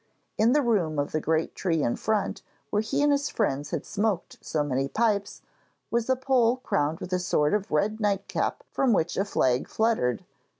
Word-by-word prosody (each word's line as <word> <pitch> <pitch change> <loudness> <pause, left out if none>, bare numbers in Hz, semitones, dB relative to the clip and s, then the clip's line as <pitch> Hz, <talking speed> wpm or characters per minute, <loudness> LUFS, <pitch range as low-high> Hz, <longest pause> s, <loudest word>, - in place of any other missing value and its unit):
In 225 +3 +3
the 295 0 +3
room 185 - +1
of 145 0 -1
the 155 - -1
great 160 +1 0
tree 165 -5 0
in 120 - +1
front, 215 -2 -1 0.3
where 210 - +2
he 220 +6 0
and 290 - +4
his 285 0 +1
friends 145 -9 -1
had - - -3
smoked 205 -3 -2
so 150 -2 -1
many 135 -1 -1
pipes, 205 +3 0 0.5
was 235 +1 0
a 260 - +4
pole 255 -2 +2
crowned 165 - -1
with 185 - -6
a 180 - +2
sort 150 -4 +1
of 210 -1 0
red 210 +8 +1
nightcap 200 -2 -1
from 260 -4 +2
which 170 -3 +1
a 195 - +1
flag 130 -10 +1
fluttered. 220 - 0
200 Hz, 195 wpm, -27 LUFS, 155-230 Hz, 0.5 s, and